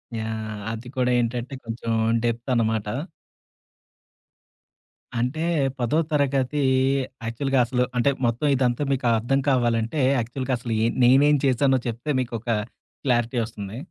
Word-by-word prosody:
Yeah! 110 Hz, -1 st, -4 dB
అది 115 Hz, +2 st, -7 dB
కూడా 125 Hz, 0 st, +2 dB
ఏంటంటే, 120 Hz, +3 st, -2 dB
కొంచెం 115 Hz, 0 st, -4 dB, 0.3 s
డెప్తనమాట. 115 Hz, -2 st, 0 dB, 2.3 s
అంటే, 125 Hz, +7 st, -1 dB, 0.4 s
10థ్ 125 Hz, +7 st, +1 dB
తరగతి 140 Hz, -1 st, +1 dB, 0.6 s
యాక్చువల్‌గా 135 Hz, +3 st, 0 dB
అసలు 125 Hz, 0 st, 0 dB
అంటే, 140 Hz, +4 st, +3 dB
మొత్తం 120 Hz, +6 st, 0 dB
ఇదంతా 125 Hz, +1 st, +1 dB
మీకు 130 Hz, -2 st, 0 dB
అర్థం 135 Hz, +5 st, +1 dB
కావాలంటే 120 Hz, +1 st, +1 dB, 0.2 s
యాక్చువల్‌గా 130 Hz, +3 st, -3 dB
అసలు 115 Hz, -2 st, -3 dB
యె 115 Hz, -, +3 dB, 0.2 s
నేనేం 145 Hz, +4 st, +5 dB
చేశానో 130 Hz, 0 st, +3 dB
చెప్తే 120 Hz, +6 st, -5 dB
మీకొక 120 Hz, -1 st, -5 dB, 0.5 s
క్లారిటీ 120 Hz, -2 st, +1 dB
వస్తుంది. 105 Hz, -1 st, -8 dB
120 Hz, 110 wpm, -24 LUFS, 115-135 Hz, 2.3 s, నేనేం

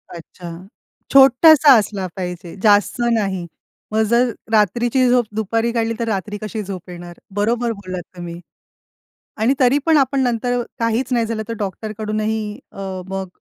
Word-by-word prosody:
अच्छा, 170 Hz, +1 st, -10 dB, 0.6 s
छोटासा 275 Hz, +2 st, +7 dB
असला 205 Hz, -3 st, -2 dB
पाहिजे, 180 Hz, -2 st, -6 dB
जास्त 205 Hz, +2 st, +3 dB
नाही. 195 Hz, -5 st, -1 dB, 0.5 s
मग 220 Hz, +1 st, +2 dB
जर 240 Hz, +1 st, +3 dB, 0.2 s
रात्रीची 235 Hz, +4 st, +2 dB
झोप 245 Hz, -1 st, +3 dB
दुपारी 225 Hz, +2 st, 0 dB
काढली 230 Hz, -1 st, -1 dB
तर 230 Hz, -, -2 dB
रात्री 205 Hz, 0 st, -3 dB
कशी 215 Hz, 0 st, -4 dB
झोप 185 Hz, -2 st, -8 dB
येणार? 175 Hz, -1 st, -10 dB, 0.2 s
बरोबर 235 Hz, +3 st, 0 dB
बोललात 185 Hz, -4 st, -6 dB
तुम्ही. 170 Hz, -1 st, -7 dB, 1.0 s
आणि 225 Hz, +5 st, +2 dB
तरी 260 Hz, +1 st, +4 dB
पण 320 Hz, -2 st, +4 dB
आपण 275 Hz, 0 st, +2 dB
नंतर 245 Hz, 0 st, 0 dB, 0.2 s
काहीच 230 Hz, +3 st, 0 dB
नाही 235 Hz, -2 st, +2 dB
झालं 220 Hz, -1 st, -3 dB
तर 230 Hz, -, -3 dB
डॉक्टर 210 Hz, +2 st, -4 dB
कडूनही 215 Hz, 0 st, -2 dB
अ, 190 Hz, -1 st, -6 dB
मग 195 Hz, 0 st, -4 dB
220 Hz, 150 wpm, -19 LUFS, 195-240 Hz, 1.0 s, छोटासा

